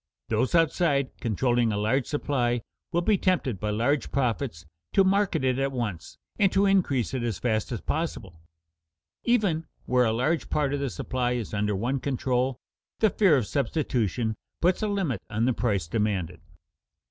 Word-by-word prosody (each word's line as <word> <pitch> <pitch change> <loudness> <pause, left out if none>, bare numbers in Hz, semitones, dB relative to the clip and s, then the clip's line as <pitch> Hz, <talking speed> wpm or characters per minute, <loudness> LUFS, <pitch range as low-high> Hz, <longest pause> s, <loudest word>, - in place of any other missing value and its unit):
Those 125 +8 +1
outside, 155 -4 +2
controlling 120 +1 +1
a 105 - -1
large 110 +5 +1
supply, 125 -6 0 0.3
will 175 +1 +1
be 205 0 +3
tempted 145 - 0
by 105 - -2
large 120 +7 0
profits 110 - -1 0.3
to 195 - +5
market 195 -5 +2
it 130 0 +1
at 135 0 0
once 115 -9 -4 0.2
and 195 -2 +4
to 195 +1 +4
increase 170 - +2
it 130 - -1
as 115 -5 -2
fast 110 -1 -1
as 115 - -3
possible. 100 - -4 0.8
Even 200 -10 +2 0.2
where 125 -1 +3
a 110 - +2
large 130 +3 0
part 145 -2 +1
of 145 - -1
the 140 -1 -1
supply 125 +1 -2
is 120 -4 -4
under 105 0 0
one 125 +7 -1
control, 130 -1 0 0.4
the 220 -3 +3
fear 185 -9 +4
of 125 - 0
substitution 120 - -1 0.3
puts 180 +4 +2
a 215 - +1
limit 190 - -1
on 110 +2 0
the 130 - +2
price 100 -8 0
demanded. 95 -4 -1
130 Hz, 170 wpm, -27 LUFS, 110-155 Hz, 0.8 s, to